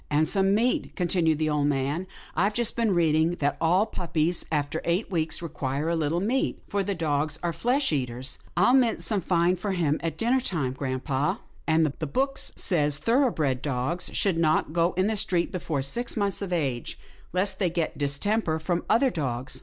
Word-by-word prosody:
" -, -, -34 dB
And 150 Hz, +1 st, +2 dB
some 195 Hz, +3 st, +2 dB
meat," 240 Hz, +4 st, 0 dB
continued 170 Hz, -3 st, +2 dB
the 155 Hz, 0 st, 0 dB
old 145 Hz, -1 st, +1 dB
man. 145 Hz, +6 st, -1 dB
" -, -, -21 dB
I've 200 Hz, +5 st, +1 dB
just 235 Hz, -2 st, +1 dB
been 225 Hz, -5 st, +1 dB
reading 160 Hz, 0 st, +2 dB
that 145 Hz, -3 st, 0 dB
all 180 Hz, +5 st, +3 dB
puppies, 170 Hz, -3 st, -1 dB
after 150 Hz, +1 st, -1 dB
eight 180 Hz, +5 st, -1 dB
weeks, 160 Hz, -1 st, -1 dB
require 145 Hz, -1 st, -2 dB
a 170 Hz, -, +1 dB
little 160 Hz, +1 st, 0 dB
meat, 235 Hz, +8 st, 0 dB
for 200 Hz, -1 st, -1 dB
dogs 155 Hz, -5 st, -1 dB
are 170 Hz, -1 st, 0 dB
flesh 245 Hz, -, +1 dB
eaters." 125 Hz, -2 st, -2 dB
" -, -, -26 dB
I'll 210 Hz, +8 st, +5 dB
mince 250 Hz, -4 st, +3 dB
some 210 Hz, -4 st, +1 dB
fine 175 Hz, +1 st, +2 dB
for 195 Hz, +2 st, -2 dB
him 160 Hz, -5 st, +1 dB
at 165 Hz, -1 st, -3 dB
dinner 245 Hz, +3 st, +2 dB
time, 155 Hz, -, -2 dB
grampa." 130 Hz, +1 st, -2 dB
" -, -, -30 dB
And 160 Hz, 0 st, +4 dB
the 155 Hz, +1 st, -3 dB
book 270 Hz, -, -1 dB
says 150 Hz, -5 st, 0 dB
thoroughbred 155 Hz, -, +1 dB
dogs 140 Hz, +5 st, -2 dB
should 185 Hz, -5 st, +1 dB
not 155 Hz, -1 st, +2 dB
go 170 Hz, +1 st, +2 dB
in 185 Hz, +1 st, +1 dB
the 220 Hz, +1 st, 0 dB
street 180 Hz, -4 st, +1 dB
before 160 Hz, -6 st, -2 dB
six 235 Hz, -, -1 dB
months 200 Hz, -2 st, 0 dB
of 195 Hz, -2 st, -4 dB
age, 135 Hz, -9 st, -2 dB, 0.3 s
lest 185 Hz, +3 st, -1 dB
they 185 Hz, -4 st, +2 dB
get 165 Hz, -2 st, -2 dB
distemper 160 Hz, +5 st, +1 dB
from 170 Hz, +2 st, -2 dB
other 250 Hz, +4 st, +4 dB
dogs." 130 Hz, -, -3 dB
165 Hz, 195 wpm, -26 LUFS, 150-195 Hz, 0.3 s, I'll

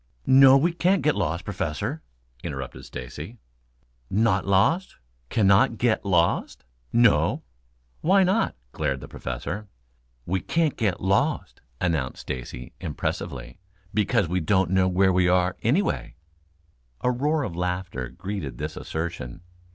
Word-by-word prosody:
"No, 135 Hz, 0 st, +8 dB
we 165 Hz, +5 st, +2 dB
can't 180 Hz, +2 st, +2 dB
get 150 Hz, -, +3 dB
lost, 85 Hz, +1 st, -1 dB
Professor," 110 Hz, -, -3 dB, 0.4 s
interrupted 70 Hz, -5 st, -6 dB
Stacy. 75 Hz, -, -8 dB, 0.7 s
"Not 100 Hz, -1 st, +2 dB
lost 110 Hz, -, +2 dB, 0.3 s
cannot 110 Hz, +4 st, +4 dB
get 120 Hz, -1 st, +1 dB
lost?" 85 Hz, -3 st, +1 dB, 0.3 s
"No." 115 Hz, -3 st, +3 dB, 0.6 s
"Why 190 Hz, +4 st, +5 dB
not?" 190 Hz, -, +1 dB, 0.2 s
glared 70 Hz, -3 st, -1 dB
the -, -, -9 dB
Professor. 90 Hz, -, -5 dB, 0.6 s
"We 95 Hz, +2 st, 0 dB
can't 165 Hz, -3 st, +1 dB
get 100 Hz, -6 st, -1 dB
lost," 125 Hz, -, 0 dB, 0.2 s
announced 80 Hz, -7 st, -1 dB
Stacy 60 Hz, -1 st, -6 dB
impressively, -, -, -4 dB, 0.3 s
"because 100 Hz, -3 st, +2 dB
we 90 Hz, +2 st, 0 dB
don't 95 Hz, +2 st, +2 dB
know 95 Hz, -1 st, +3 dB
where 95 Hz, +1 st, +3 dB
we 90 Hz, 0 st, +3 dB
are, 90 Hz, 0 st, +2 dB
anyway." 115 Hz, -, 0 dB, 0.9 s
A 125 Hz, -, +2 dB
roar 145 Hz, +5 st, 0 dB
of 95 Hz, -10 st, -4 dB
laughter 90 Hz, -7 st, -3 dB
greeted 85 Hz, -3 st, -5 dB
this 75 Hz, +3 st, -4 dB
assertion. 80 Hz, -3 st, -5 dB
95 Hz, 125 wpm, -25 LUFS, 85-125 Hz, 0.9 s, No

